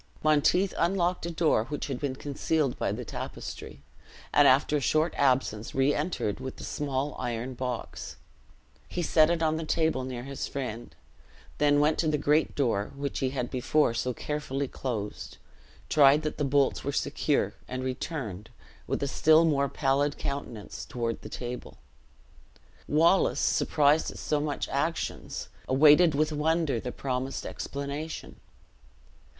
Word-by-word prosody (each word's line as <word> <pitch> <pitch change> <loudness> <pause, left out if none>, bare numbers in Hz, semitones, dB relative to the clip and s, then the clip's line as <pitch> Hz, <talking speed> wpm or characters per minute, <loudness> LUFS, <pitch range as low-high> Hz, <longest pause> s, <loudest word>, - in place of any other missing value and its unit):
Monteith 155 +5 +3
unlocked 175 0 +1
a - - -3
door 160 -9 +2
which 145 +3 -4
had 135 -3 -4
been 140 -3 -2
concealed 145 0 -1
by - - 0
the - - -4
tapestry, 70 - -7 0.5
and 145 -1 +6
after 140 +3 +4
a - - -2
short 155 +4 +2
absence 125 -5 +1
re 135 +2 +3
entered 150 - -2
with 130 0 -7
a - - -8
small 140 0 -2
iron 120 +1 -3
box. 125 -1 -5 0.7
He 175 - -2
set 155 -1 +4
it 170 -1 +1
on 160 0 +2
the 165 - -3
table 160 -4 +1
near 125 -2 -5
his 135 +1 -5
friend, 120 -4 -5 0.6
then 145 -1 +4
went 150 +1 +2
to 165 - +2
the 155 -1 +2
great 150 +2 +2
door, 115 -7 0
which 140 0 -3
he 130 - 0
had 125 -2 -3
before 130 0 +2
so 125 +2 -1
carefully 140 +1 -3
closed, 115 -6 -5 0.5
tried 145 +1 +5
that 155 - -3
the - - +1
bolts 140 0 +2
were 140 - -1
secure, 145 +1 0
and 130 0 -4
returned, 125 - -4 0.4
with - - -1
a - - 0
still 155 +4 +5
more 140 -3 +2
pallid 140 +1 +1
countenance, 125 -6 -5
toward 115 -2 -3
the 110 - -9
table. 125 +2 -6 1.1
Wallace, 165 +5 +3
surprised 150 +1 +3
at - - -9
so 150 - 0
much 150 -1 -2
actions, 160 +4 -3 0.2
awaited 150 +4 +6
with 155 +2 +1
wonder 155 -3 +1
the 125 - -5
promised 130 0 -3
explanation. 140 +3 -5
140 Hz, 150 wpm, -28 LUFS, 130-155 Hz, 1.1 s, and